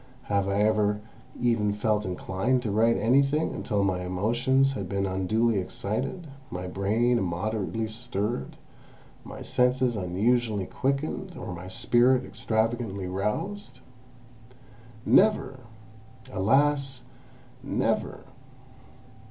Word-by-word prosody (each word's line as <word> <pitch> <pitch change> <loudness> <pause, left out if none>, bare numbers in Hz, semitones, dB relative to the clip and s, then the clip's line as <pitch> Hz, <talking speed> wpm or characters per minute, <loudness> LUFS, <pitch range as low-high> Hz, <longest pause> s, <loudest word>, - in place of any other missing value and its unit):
Have 100 -3 0
I 100 +1 +2
ever 105 -1 +2 0.4
even 115 -4 +2
felt 105 0 0
inclined 95 +7 -1
to 110 - -1
write 115 +3 +3
anything, 140 +7 +2
until 105 -4 -1
my 95 -2 +1
emotions 120 +9 +1
had 135 - -5
been 100 -1 0
unduly 100 +4 +1
excited, 120 - -3 0.2
my 90 +1 -5
brain 110 +6 +1
immoderately 105 +4 -2
stirred, 110 0 -4 0.7
my - - -9
senses 125 -1 +2
unusually 105 +3 +1
quickened, 140 - -2
or - - -6
my 90 +1 -8
spirit 125 +6 +3
extravagantly 110 -3 -1
roused? 105 - -3 1.2
Never! 190 -11 +3 0.7
Alas, 135 +4 +2 0.6
never! - - -1
110 Hz, 100 wpm, -27 LUFS, 100-125 Hz, 1.2 s, write